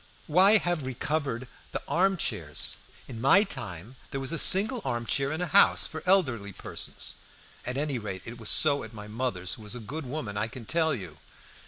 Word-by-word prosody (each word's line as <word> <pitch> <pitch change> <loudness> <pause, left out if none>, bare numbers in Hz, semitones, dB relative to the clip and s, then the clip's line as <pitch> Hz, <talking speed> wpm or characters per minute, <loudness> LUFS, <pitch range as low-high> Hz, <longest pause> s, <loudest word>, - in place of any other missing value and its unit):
Why 190 +7 +6
have 175 -8 -1
recovered 130 -1 -2 0.3
the - - -2
arm 190 +2 +2
chairs? 75 - -2 0.3
In 115 -3 -7
my 165 - +6
time 120 - -6
there 135 - -4
was 135 0 0
a 165 - 0
single 220 +6 +4
arm 120 0 -2
chair 140 +3 0
in 160 +3 -3
a - - +1
house, 150 - +5
for 155 - -6
elderly 130 - +2
persons - - -4 0.5
at 125 +1 -2
any 140 -3 -1
rate 95 -4 -6
it 115 +1 -8
was 110 - -4
so 145 -2 +4
at - - -10
my 105 -1 -9
mother's, 105 -5 -3
who - - -9
was 105 +2 -4
a - - -6
good 140 +7 -6
woman, 125 -7 -4
I 105 +2 0
can 120 0 -9
tell 160 +2 +2
you. 90 -9 -9
130 Hz, 200 wpm, -28 LUFS, 110-160 Hz, 0.5 s, Why